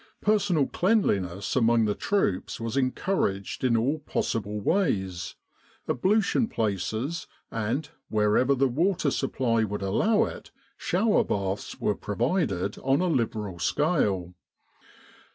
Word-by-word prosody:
Personal 200 -8 +2
cleanliness 100 - 0
among 115 -2 +4
the 105 - +1
troops 105 - -1
was 115 +1 -3
encouraged 130 - -1
in 120 -3 +3
all 135 +7 0
possible 105 -7 -2
ways, 95 - 0 0.5
ablution 210 - +2
places, 110 - -2 0.2
and 115 +7 -2 0.2
wherever 110 +6 +3
the 135 +1 +3
water 160 +3 +1
supply 115 -4 0
would 105 -1 -3
allow 210 - +2
it - - -6 0.3
shower 205 +5 +2
baths, 100 0 -3
were 105 - +1
provided 105 - -1
on 135 +1 +2
a 185 - +1
liberal 110 - -1
scale. 100 - +1
115 Hz, 115 wpm, -27 LUFS, 100-165 Hz, 0.5 s, among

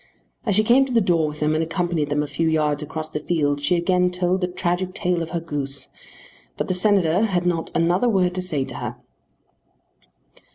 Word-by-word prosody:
As 205 - +2
she 215 - +4
came 245 +5 +5
to 265 - -7
the 235 - +4
door 170 -6 +2
with 150 0 -7
them 150 +1 +2
and 155 +1 +1
accompanied 170 -2 -1
them 145 0 +1
a - - -4
few 160 +3 0
yards 150 -2 +1
across 155 +1 -5
the 150 - -4
field 145 -3 0
she 145 +5 +2
again 180 +1 +2
told 180 +1 0
the 180 - +1
tragic 180 +1 -2
tale 175 -1 0
of 165 - -4
her 170 0 -2
goose; 145 -4 -5 0.7
but - - -2
the - - 0
Senator 185 -2 +2
had 180 -4 0
not 170 -2 0
another 175 +8 +2
word 185 -4 +2
to 185 - -2
say 150 -7 -2
to - - -7
her. - - -5
175 Hz, 210 wpm, -22 LUFS, 155-180 Hz, 0.7 s, came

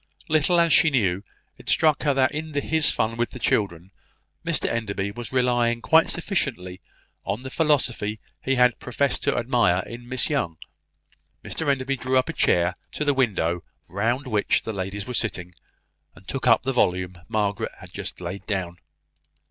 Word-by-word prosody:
Little 155 +3 +3
as 170 -2 +4
she 165 - +6
knew, 100 -8 +1 0.4
it - - -8
struck 155 -2 +3
her 145 -2 +2
that 130 -1 +3
in 155 +1 -5
his 155 +2 +3
fun 115 +1 -1
with 120 0 0
the - - -9
children, 95 -6 -1 0.5
Mr - - 0
Enderby 100 -3 -2
was 120 +2 -7
relying 120 -2 +2
quite 160 +7 +4
sufficiently 125 - -2 0.4
on 120 - -3
the 130 - -6
philosophy 125 -9 +1 0.2
he 135 - +1
had 125 -1 +3
professed 135 +2 0
to - - +1
admire 115 -7 +2
in 120 +1 -10
Miss 130 -1 +1
Young. 95 - -1 0.9
Mr 160 -3 -2
Enderby 135 0 0
drew 130 +1 0
a 130 +6 +1
chair 90 - +2 0.2
to 150 - -2
the 145 - +3
window 90 -10 0 0.2
round 120 +8 -1
which 110 -5 +1
the 110 - -4
ladies 95 +1 -4
were 125 - -5
sitting, 95 -7 -2 0.6
and 95 - -18
took 135 -2 -3
up 115 -2 +5
the 135 +1 -1
volume 90 -5 0
Margaret 105 -2 -1
had - - -13
just - - -6
laid 90 +3 -6
down. 95 -4 -2
120 Hz, 170 wpm, -24 LUFS, 100-135 Hz, 0.9 s, she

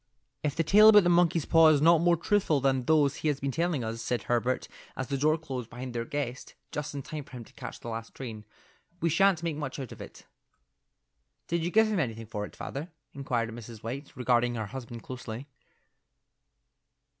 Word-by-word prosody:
"If 150 -2 -1
the 165 - +1
tale 210 +6 +7
about 210 -2 +8
the 175 - +3
monkey's 170 -2 +3
paw 165 -1 +6
is 155 -2 +5
not 165 +2 +5
more 175 0 +4
truthful 170 -4 +2
than 135 -2 +1
those 150 -3 +3
he - - -2
has 145 -2 +1
been 140 0 -2
telling 165 -3 0
us," 115 +1 -4
said 120 0 -2
Herbert, 120 +1 0 0.3
as 130 0 -4
the 140 - 0
door 155 +3 +3
closed 130 -7 -6
behind 125 +1 -7
their 115 -1 -2
guest, 135 -2 -4 0.2
just 150 0 -4
in 140 - -4
time 150 +1 -6
for - - -19
him 125 -2 -7
to - - -19
catch - - -8
the - - -10
last 115 0 -6
train, 110 -5 -7 0.6
"we 170 - +1
sha'nt 195 -1 +3
make 165 -3 -2
much 145 -3 -4
out 135 -4 -6
of - - -10
it." - - -11 1.2
"Did 170 -1 -1
you 170 - 0
give 220 +4 +5
him 215 -3 0
anything 115 -6 -2
for 105 -1 -4
it, - - -13
father?" 145 +6 -6 0.2
inquired 120 -4 -2
Mrs. 115 -1 -10
White, 135 +5 -5
regarding 120 -1 +2
her 110 -2 -2
husband 120 +1 -8
closely. 125 -1 -7
135 Hz, 205 wpm, -29 LUFS, 120-160 Hz, 1.2 s, about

